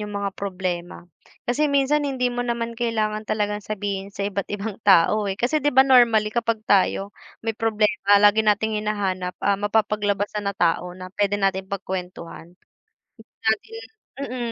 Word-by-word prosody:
'yung 210 -1 -5
mga 200 -1 -2
problema. 180 -4 -4 0.4
Kasi 295 +5 +1
minsan 280 +1 +2
hindi 250 -2 -1
mo 245 - -3
naman 235 -1 -2
kailangan 220 -2 -2
talagang 210 -1 -1
sabihin 200 -1 -4
sa 200 0 -5
iba't 200 -1 -3
ibang 205 +1 -5
tao, 200 +2 +4
eh. 195 - -3
Kasi 260 +8 0
'di 290 - +1
ba, 265 - +8
normally 230 -5 +4
kapag 230 -2 -1
tayo 200 0 +2 0.3
may 225 - 0
problema, 215 -2 +2
lagi 205 +1 +5
nating 215 0 +1
hinahanap, 190 -4 -2
ah, 200 -1 +2
mapapaglabasan 205 -1 0
na 200 - -4
tao 175 +1 0
na 185 0 -10
puwede 205 0 0
nating 195 -1 -1
pagkuwentuhan. 180 -3 -6 0.8
Dahil 220 - -1 0.5
mm, 240 -2 -4
210 Hz, 155 wpm, -23 LUFS, 195-225 Hz, 0.8 s, ba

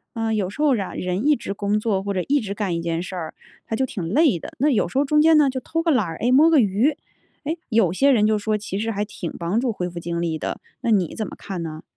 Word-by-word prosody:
呃， 225 -1 -1
有 200 -4 0
时 250 +10 -6
候 290 -4 +4
啊， 195 -4 -4
人 180 +6 -2
一 300 - +5
直 215 - -5
工 205 +1 0
作 205 -3 -1
或 200 0 -2
者 185 - 0
一 285 +1 +2
直 200 -3 -4
干 200 -4 -2
一 170 - -2
件 165 0 -2
事 185 +1 -6
儿， 160 -3 -5 0.3
他 225 - -3
就 265 - +1
挺 195 -8 -5
累 275 - +3
的。 - - -9
那 290 +4 +2
有 250 - +2
时 - - -5
候 280 - +3
中 300 +2 +3
间 320 0 +6
呢， 295 -2 +5
就 260 0 -3
偷 330 +5 -2
个 330 - 0
懒 250 -8 +2
儿， 165 -2 -6
诶， 245 - 0
摸 295 +6 +6
个 320 -3 +5
鱼， 230 +7 +2 0.5
诶， 320 +4 -2
有 215 -8 +3
些 275 +8 +4
人 215 -4 +4
就 215 - +2
说 215 +1 -1
其 200 -2 -5
实 225 +2 -1
还 205 -1 -2
挺 180 -5 -6
帮 175 +6 0
助 250 -1 0
恢 180 -4 -3
复 175 0 -7
精 170 0 -3
力 165 -2 -1
的， - - -4 0.2
那 235 -3 0
你 190 -7 +1
怎 220 - -3
么 - - -8
看 185 -4 -5
呢？ 155 -1 -7
210 Hz, 315 characters per minute, -22 LUFS, 185-265 Hz, 0.5 s, 间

